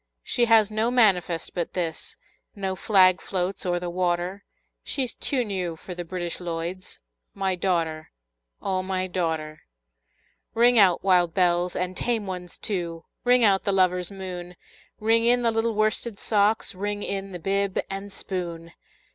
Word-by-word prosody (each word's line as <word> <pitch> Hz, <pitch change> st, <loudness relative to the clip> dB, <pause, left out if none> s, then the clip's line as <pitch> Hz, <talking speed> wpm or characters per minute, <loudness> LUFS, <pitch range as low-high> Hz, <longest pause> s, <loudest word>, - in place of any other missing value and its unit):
She 240 Hz, -, +1 dB
has 220 Hz, -2 st, +5 dB
no 220 Hz, +2 st, +1 dB
manifest 190 Hz, -9 st, +2 dB
but 175 Hz, -2 st, -3 dB
this, 170 Hz, -3 st, -4 dB, 0.4 s
No 190 Hz, -2 st, -2 dB
flag 185 Hz, -2 st, +4 dB
floats 185 Hz, 0 st, -2 dB
o'er 175 Hz, 0 st, +1 dB
the 175 Hz, -, -5 dB
water, 180 Hz, +2 st, -1 dB, 0.4 s
She's 260 Hz, -4 st, -2 dB
too 255 Hz, -4 st, -1 dB
new 185 Hz, -5 st, -3 dB
for 180 Hz, +3 st, -9 dB
the 175 Hz, 0 st, -5 dB
British 175 Hz, 0 st, -4 dB
Lloyds 175 Hz, +1 st, -5 dB, 0.4 s
My 195 Hz, -1 st, 0 dB
daughter, 170 Hz, -4 st, -1 dB, 0.5 s
O 190 Hz, -1 st, 0 dB
my 185 Hz, 0 st, -2 dB
daughter! 160 Hz, -4 st, -3 dB, 0.9 s
Ring 240 Hz, +1 st, +5 dB
out, 185 Hz, -4 st, +5 dB
wild 180 Hz, -3 st, +3 dB
bells, 180 Hz, -1 st, +2 dB
and 180 Hz, 0 st, -2 dB
tame 230 Hz, -1 st, -1 dB
ones 180 Hz, -2 st, -6 dB
too! 170 Hz, -5 st, -4 dB, 0.2 s
Ring 245 Hz, 0 st, +4 dB
out 195 Hz, -3 st, +4 dB
the 200 Hz, -, +1 dB
lover's 180 Hz, -2 st, +2 dB
moon! 180 Hz, -2 st, -7 dB, 0.4 s
Ring 225 Hz, +1 st, +3 dB
in 245 Hz, +1 st, +3 dB
the 230 Hz, -, +3 dB
little 225 Hz, 0 st, 0 dB
worsted 215 Hz, +1 st, 0 dB
socks! 210 Hz, +1 st, +1 dB
Ring 205 Hz, +2 st, -3 dB
in 195 Hz, 0 st, -3 dB
the 180 Hz, -, -5 dB
bib 195 Hz, +2 st, -1 dB
and 195 Hz, +1 st, -6 dB
spoon! 170 Hz, -4 st, -5 dB
185 Hz, 155 wpm, -25 LUFS, 175-205 Hz, 0.9 s, has